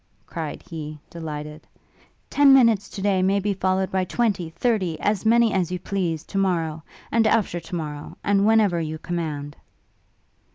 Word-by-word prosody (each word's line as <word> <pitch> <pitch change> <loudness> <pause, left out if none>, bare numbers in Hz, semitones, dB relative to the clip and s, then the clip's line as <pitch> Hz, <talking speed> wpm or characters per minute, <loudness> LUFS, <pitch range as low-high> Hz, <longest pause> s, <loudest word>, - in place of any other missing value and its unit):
cried 160 -3 -6
he, 155 -2 -7
delighted; 150 -2 -7 0.6
'ten 285 -1 +6
minutes 225 -6 +4
to 195 - -7
day 195 -2 +2
may 195 +2 +2
be 200 +1 0
followed 190 0 0
by 190 -1 +1
twenty, 190 -4 -1
thirty, 185 -3 -1
as 205 0 0
many 230 -1 +4
as 180 -2 0
you 180 - -1
please, 175 -4 -2
to 195 - -3
morrow, 165 -5 0 0.3
and 225 -1 +3
after 215 -6 +1
to 170 +2 -7
morrow, 150 -3 -6
and 200 -1 +2
whenever 210 -6 +3
you 155 0 -4
command.' 155 -4 -4
185 Hz, 160 wpm, -23 LUFS, 160-205 Hz, 0.6 s, ten